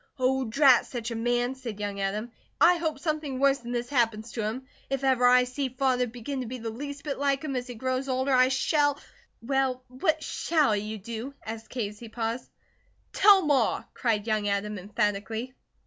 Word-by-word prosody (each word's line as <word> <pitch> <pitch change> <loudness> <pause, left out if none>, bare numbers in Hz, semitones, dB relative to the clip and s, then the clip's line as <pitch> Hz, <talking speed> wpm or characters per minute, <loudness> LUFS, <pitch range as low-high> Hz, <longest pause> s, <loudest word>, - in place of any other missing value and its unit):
"Oh, 260 0 +1
drat 260 +2 +5
such 235 -2 -5
a - - -3
man!" 240 +2 0
said 240 -6 -7
young 205 -1 -3
Adam. 210 +4 -2 0.3
"I 355 +1 +6
hope 320 -3 -2
something 300 -3 -2
worse 275 0 +4
that 240 0 -8
this 240 0 -2
happens 230 -4 0
to 230 - -3
him. 225 +5 -3 0.2
If 270 0 -2
ever 255 -2 +4
I 250 0 +6
see 255 +2 -3
Father 255 -1 +1
begin 245 +3 -5
to 250 - -5
be 255 +2 -5
the 225 -1 -5
least 285 +4 -7
bit 285 -3 -4
like 280 0 +1
him 285 -3 -3
as 250 0 -3
he 245 - -7
grows 260 +3 -2
older 260 +1 +1
I 255 0 +6
shall 290 +2 +2 0.3
" - - -39
"Well, 260 0 0
what 310 +5 0
shall 300 -9 +1
you 210 +1 -4
do?" 235 +6 -6
asked 225 0 -7
Kate, 235 -5 -2
as 210 0 -13
he 235 - -9
paused. 230 +2 -3 0.6
"Tell 395 -1 +6
Ma!" 270 -6 +2
cried 220 -4 0
young 215 -2 0
Adam, 205 0 -1
emphatically. 210 +5 -2
250 Hz, 200 wpm, -27 LUFS, 225-275 Hz, 0.6 s, I